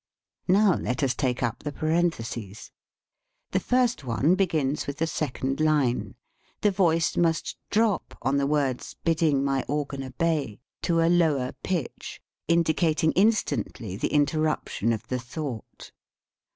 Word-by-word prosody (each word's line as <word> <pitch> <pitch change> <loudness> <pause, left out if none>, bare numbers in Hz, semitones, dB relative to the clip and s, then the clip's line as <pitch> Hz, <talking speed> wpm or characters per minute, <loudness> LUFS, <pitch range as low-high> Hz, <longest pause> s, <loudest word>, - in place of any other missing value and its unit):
Now 195 +1 +5
let 125 +2 -2
us 130 -2 +2
take 125 -1 -1
up 120 -3 -1
the 150 - -4
parentheses. 135 - -2 0.8
The - - +2
first 250 - +1
one 130 +7 +2
begins 160 -7 0
with 140 - -4
the 165 - +1
second 135 -4 -2
line. 150 -6 +1 0.5
The 210 - +3
voice 165 -3 +2
must 165 -1 +1
drop 215 -2 +1
on 135 +3 +2
the 140 0 +1
words, 140 -4 -1
"Bidding 160 -4 +2
my 135 -2 0
organ 140 -1 -2
obey," 140 -3 -1 0.2
to 165 -2 +2
a 165 - +3
lower 155 -7 +2
pitch, 175 -9 -4 0.3
indicating 160 -1 +2
instantly 190 - 0
the 120 - -2
inter 150 +1 +2
ruption 155 -7 0
of 110 -2 -3
the 125 - -2
thought. 125 -2 -7
150 Hz, 140 wpm, -26 LUFS, 130-165 Hz, 0.8 s, Now